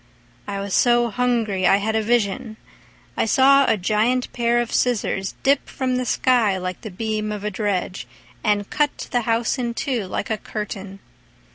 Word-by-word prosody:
I 200 -1 -3
was 200 -1 -4
so 240 -1 +3
hungry 225 -6 +1
I - - +6
had 220 +2 -1
a 220 - +2
vision: 220 0 0 0.6
I - - +1
saw 275 +4 +5
a - - +3
giant 215 +7 0
pair 240 0 +1
of 240 -1 -2
scissors 200 -5 0
Dip 275 +1 +2
from 255 -1 -1
the 255 - -1
sky, 230 -7 +2
like 185 -1 -5
the 220 - -7
beam 215 +2 -3
of 210 -1 -5
a 210 - -2
dredge, 190 - -2 0.4
And 205 -1 +1
cut 295 -1 -1
the 245 - +2
house 230 +3 0
in 235 -1 -2
two 240 -8 -2
like 185 - -4
a 215 - -1
curtain. 195 -2 -6
220 Hz, 175 wpm, -22 LUFS, 200-245 Hz, 0.6 s, I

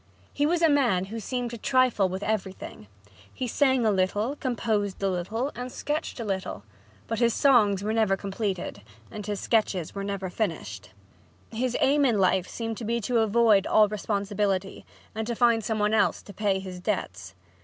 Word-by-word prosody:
He 290 +1 +1
was 340 +1 +1
a - - +7
man 245 - +2
who 225 - -3
seemed 245 +2 -3
to 235 - -7
trifle 255 -6 +2
with 190 +2 -4
everything. 190 - -4 0.4
He 255 - -4
sang 260 -1 +2
a 215 - +4
little, 205 +7 0
composed 220 -7 -2
a - - +3
little 220 +10 -2
and 250 +1 -6
sketched 295 -1 -3
a 230 - -3
little. 190 - -3 0.4
But 225 - -3
his 235 -2 +3
songs 210 -8 +4
were 215 +1 -1
never 215 -4 +2
completed 195 - -4 0.3
and 210 - -6
his 205 -1 -2
sketches 205 -7 0
never 195 -2 -4
finished. 135 - -4 0.6
His 245 +2 -1
aim 285 +2 +3
in 240 -6 +3
life 185 -1 +2
seemed 225 -2 -4
to - - -6
be 235 +2 0
to 235 +2 +1
avoid 220 -2 +4
all 215 -1 +5
responsibility, 200 -2 -2 0.3
and 220 0 -4
to 235 - -2
find 230 -2 +3
some 220 +1 -1
one 210 0 +1
else 220 - +2
to 200 - -12
pay 200 -1 0
his 185 -1 -7
debts. 95 - -4
215 Hz, 180 wpm, -26 LUFS, 195-235 Hz, 0.6 s, a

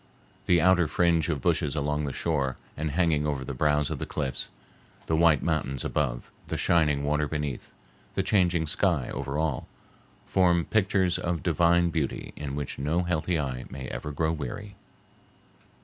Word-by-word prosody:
The 90 -1 +5
outer 90 -1 +4
fringe 85 0 +2
of 70 -6 -2
bushes 75 0 +1
along 75 0 -1
the 70 - -2
shore 70 -4 -1 0.2
and 75 0 -2
hanging 75 -1 +1
over 70 -3 -2
the 70 - -4
brows 75 +2 +1
of - - -3
the - - -4
cliffs, 70 -4 -2 0.6
the 80 - +1
white 80 -3 +4
mountains 70 -5 -1
above, 65 -6 -2 0.2
the - - -2
shining 75 -4 +2
water 75 +1 +1
beneath, 75 -3 -4 0.4
the - - +1
changing 90 -5 +2
sky 80 -4 +1
over 70 +2 -3
all, 80 -4 -1 0.6
form 90 -2 +3
pictures 95 -4 +2
of 85 -3 -2
divine 85 +1 +3
beauty 80 -5 -3
in 70 -2 -5
which 70 -2 -4
no 80 +6 0
healthy 85 0 0
eye 65 -4 -3
may 65 -1 -7
ever - - -5
grow 80 +2 0
weary. 100 +6 -5
75 Hz, 165 wpm, -27 LUFS, 70-85 Hz, 0.6 s, The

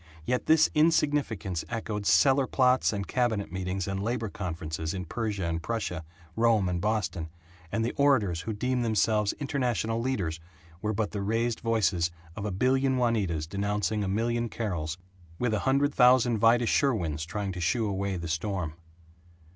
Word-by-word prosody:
Yet 125 0 -1
this 160 0 +6
insignificance 145 - +1
echoed 110 -3 -3
cellar 130 - +4
plots 130 -1 +3
and 100 -2 -3
cabinet 115 -7 0
meetings 95 0 -3
and 95 0 -2
labor 115 0 -2
conferences 80 -3 -4
in 90 -1 -4
Persia 105 -1 -3
and 85 0 -2
Prussia, 90 -4 -3 0.3
Rome 115 -4 +3
and 90 -1 -1
Boston, 90 -6 -1 0.4
and 115 0 0
the 120 - -2
orators 115 -12 +3
who 110 +4 -4
deemed 125 +4 -1
themselves 110 -2 +2
international 120 - -1
leaders 95 -11 -2 0.4
were 105 - -1
but 105 -1 -1
the 100 - -3
raised 115 +3 0
voices 95 -7 +1 0.3
of 100 - -5
a 105 - -2
billion 130 +6 +2
Juanitas 105 -11 0
denouncing 105 +3 -1
a - - -2
million 115 +4 0
Carols, 85 -9 -3 0.4
with 125 -3 0
a 105 - +1
hundred 140 +2 +2
thousand 125 -2 +5
Vida 115 +2 +4
Sherwins 90 - +1
trying 100 +4 -3
to 90 -1 -6
shoo 105 +6 +1
away 100 -1 -2
the 85 0 -5
storm. 85 -1 -2
105 Hz, 160 wpm, -28 LUFS, 90-120 Hz, 0.4 s, this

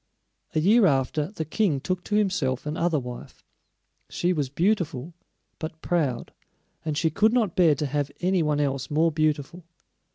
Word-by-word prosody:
A - - +3
year 205 +6 +5
after, 140 +2 +1
the 170 -4 -5
King 160 -3 +1
took 185 +5 -3
to 210 - -1
himself 180 -12 0
another 160 +2 0
wife. 125 -1 -9 0.6
She 180 +1 0
was 145 -6 -1
beautiful 165 - -1 0.5
but 160 -1 -6
proud, 145 -9 -1 0.5
and 155 -2 -2
she 160 +1 +1
could 215 +7 +3
not 220 -8 +1
bear 165 -5 +5
to 150 - -2
have 145 0 -1
any 185 0 +1
one 150 -2 +1
else 135 -2 -1
more 160 +2 +2
beautiful. 155 +2 -1
160 Hz, 160 wpm, -25 LUFS, 145-180 Hz, 0.6 s, year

